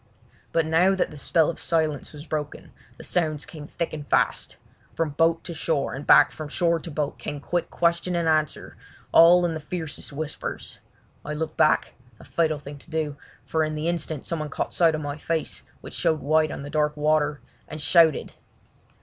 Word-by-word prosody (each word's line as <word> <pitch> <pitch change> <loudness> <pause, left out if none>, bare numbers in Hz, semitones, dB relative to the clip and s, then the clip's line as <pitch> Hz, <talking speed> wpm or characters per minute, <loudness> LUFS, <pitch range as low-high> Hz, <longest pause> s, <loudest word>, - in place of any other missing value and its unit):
But 165 -1 +2
now 175 +5 +4
that 190 - 0
the - - -10
spell 160 +2 +2
of 170 - -3
silence 155 -3 0
was 150 0 -10
broken 150 -2 -5 0.3
the - - -10
sounds 155 -4 0
came 155 -7 -10
thick 170 +1 -4
and 150 -2 -6
fast. - - +1 0.4
From 165 -2 0
boat 165 +3 +2
to 170 - -6
shore 160 -3 -1
and 140 +3 -7
back - - +7
from 155 - -7
shore 170 +2 +1
to 165 - -8
boat 150 -2 -3
came 145 - -5
quick 175 +4 -2
question 170 +1 +1
and 170 -1 0
answer, 155 -2 0 0.4
all 175 +2 +7
in 170 - 0
the 160 - -4
fiercest 160 -1 -5
whispers. 150 +1 -5 0.4
I 150 - -4
looked 155 0 -3
back—a 125 -6 0
fatal 160 -2 0
thing 145 0 -10
to 165 - -16
do—for 160 0 -3
in 155 0 -2
the 150 +2 -2
instant 165 -4 -2
someone 155 -3 -3
caught - - -3
sight 165 -2 +4
of 155 - -4
my 145 0 -4
face, 160 +1 -2 0.2
which - - -9
showed 160 -3 +1
white 155 +2 +3
on 140 - -6
the 145 - -7
dark 150 0 +1
water, 150 -1 +2 0.3
and 155 - -7
shouted. 155 +1 +4
155 Hz, 190 wpm, -25 LUFS, 150-165 Hz, 0.4 s, back